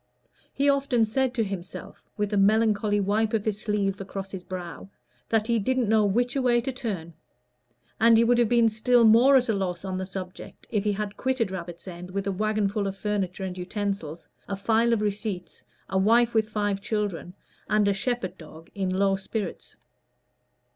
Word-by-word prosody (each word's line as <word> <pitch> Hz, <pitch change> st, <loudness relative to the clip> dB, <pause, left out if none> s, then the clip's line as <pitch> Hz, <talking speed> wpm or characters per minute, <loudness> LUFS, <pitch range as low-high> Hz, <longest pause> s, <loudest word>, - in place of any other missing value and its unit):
He 280 Hz, -, 0 dB
often 275 Hz, -5 st, +3 dB
said 260 Hz, +4 st, 0 dB
to 230 Hz, -, +2 dB
himself, 195 Hz, -3 st, -8 dB
with 210 Hz, 0 st, -1 dB
a -, -, +2 dB
melancholy 210 Hz, 0 st, +3 dB
wipe 215 Hz, +3 st, +1 dB
of 210 Hz, -, -1 dB
his 210 Hz, -1 st, -2 dB
sleeve 200 Hz, -3 st, -1 dB
across 195 Hz, 0 st, -6 dB
his 190 Hz, -2 st, -6 dB
brow, 180 Hz, 0 st, -7 dB, 0.4 s
that 220 Hz, -1 st, +2 dB
he 235 Hz, 0 st, +1 dB
"didn't 255 Hz, +2 st, 0 dB
know 215 Hz, 0 st, +4 dB
which 240 Hz, +5 st, +1 dB
a 275 Hz, -, +1 dB
way 240 Hz, -2 st, +3 dB
to 260 Hz, +3 st, -3 dB
turn"; 200 Hz, -10 st, -5 dB, 0.9 s
and 230 Hz, 0 st, +6 dB
he 230 Hz, -, +5 dB
would 240 Hz, +1 st, +3 dB
have 235 Hz, -3 st, +3 dB
been 235 Hz, -1 st, +4 dB
still 235 Hz, +3 st, +3 dB
more 235 Hz, +5 st, +6 dB
at 255 Hz, -2 st, +4 dB
a 225 Hz, -, +2 dB
loss 190 Hz, -2 st, -3 dB
on 185 Hz, -1 st, -3 dB
the 190 Hz, -, -4 dB
subject 185 Hz, -1 st, -8 dB
if 210 Hz, -4 st, 0 dB
he 210 Hz, -, +2 dB
had 205 Hz, 0 st, -4 dB
quitted 255 Hz, -6 st, 0 dB
Rabbit's 175 Hz, -1 st, -7 dB
End 180 Hz, 0 st, -8 dB
with 195 Hz, +1 st, -3 dB
a 200 Hz, -, 0 dB
wagonful 210 Hz, 0 st, 0 dB
of 195 Hz, 0 st, -5 dB
furniture 195 Hz, -2 st, -2 dB
and 185 Hz, -1 st, -4 dB
utensils, 185 Hz, -3 st, -4 dB, 0.2 s
a 200 Hz, -, -2 dB
file 225 Hz, +4 st, +2 dB
of 220 Hz, -2 st, +1 dB
receipts, 200 Hz, -4 st, -4 dB, 0.3 s
a 190 Hz, -, 0 dB
wife 230 Hz, +4 st, +4 dB
with 220 Hz, -1 st, +2 dB
five 205 Hz, -2 st, -1 dB
children, 200 Hz, -4 st, -3 dB, 0.3 s
and 210 Hz, -1 st, +3 dB
a 200 Hz, -, +3 dB
shepherd 195 Hz, -4 st, -3 dB
dog 160 Hz, 0 st, -13 dB
in 195 Hz, -2 st, -2 dB
low 195 Hz, +1 st, +2 dB
spirits. 195 Hz, 0 st, -5 dB
205 Hz, 190 wpm, -26 LUFS, 190-225 Hz, 0.9 s, and